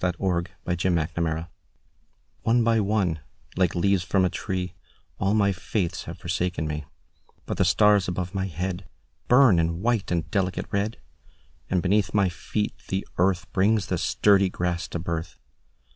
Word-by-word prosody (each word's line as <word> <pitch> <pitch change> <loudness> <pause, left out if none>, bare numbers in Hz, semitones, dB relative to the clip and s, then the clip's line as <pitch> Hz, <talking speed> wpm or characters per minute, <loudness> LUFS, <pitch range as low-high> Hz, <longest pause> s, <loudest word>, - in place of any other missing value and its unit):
Leaves 85 -2 0 0.2
By 90 - 0
Sara 85 -2 +1
Teasdale 80 0 -2 0.9
ONE 115 +1 +3
by 115 0 +3
one, 100 -6 +1 0.4
like 90 -2 +1
leaves 95 +1 +2
from 95 +1 +2
a - - +2
tree, 90 -1 -3 0.5
All 100 +2 +2
my 100 -2 +3
faiths 90 0 -2
have 85 +2 -7
forsaken 85 -1 -2
me; 75 -1 -4 0.6
But - - -4
the - - +3
stars 105 -2 +4
above 90 0 -3
my 95 -1 -1
headBurn 90 - +1
in 85 +2 -1
white 115 -3 +1
and 85 -2 -1
delicate 95 -3 0
red, 100 +3 -1 0.7
And 90 -2 +1
beneath 100 +3 +1
my 100 -3 +4
feet 105 +4 -3
the 95 +1 -2
earthBrings 95 +2 +2
the - - 0
sturdy 100 -2 +3
grass 90 -1 -2
to - - -4
birth. 85 0 -4
90 Hz, 150 wpm, -25 LUFS, 85-100 Hz, 0.9 s, stars